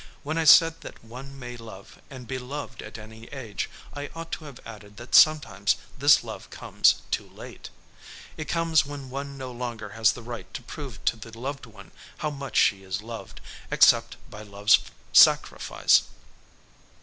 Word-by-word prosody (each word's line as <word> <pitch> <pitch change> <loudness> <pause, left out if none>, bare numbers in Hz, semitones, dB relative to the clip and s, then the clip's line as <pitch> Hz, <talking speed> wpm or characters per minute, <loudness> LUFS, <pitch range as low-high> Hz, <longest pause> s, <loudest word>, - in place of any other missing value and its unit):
When 155 +3 -2
I 165 - 0
said 165 +1 +7
that - - -11
one 135 +4 -10
may 125 -2 -8
love 110 -4 -12
and 130 -3 -10
be 130 -1 -4
loved 130 -1 -7
at 110 - -9
any 110 +1 -12
age 115 -8 -5 0.2
I 145 0 -6
ought 165 0 -8
to 155 - -5
have 140 -4 -11
added 105 -2 -12
that 120 +1 -11
sometimes 115 -11 +5 0.2
this - - +5
love - - -9
comes - - +2
too - - -2
late. - - -11 0.7
It 155 - -6
comes 165 -2 +2
when 140 -2 -8
one 140 +1 -6
no 130 -1 -6
longer 120 -3 -6
has 110 +1 +2
the 120 - -10
right 115 -6 -8
to 125 - -6
prove 130 -5 -9
to - - +1
the 115 +1 -11
loved 135 +1 -6
one 100 -3 -15 0.3
how 150 - -2
much 140 -1 -5
she 100 -3 +4
is 95 +1 -5
loved, 115 0 -9 0.3
except - - +4
by 105 - -11
love's 105 +1 +3 0.3
sacrifice. - - +5
125 Hz, 175 wpm, -26 LUFS, 110-140 Hz, 0.7 s, said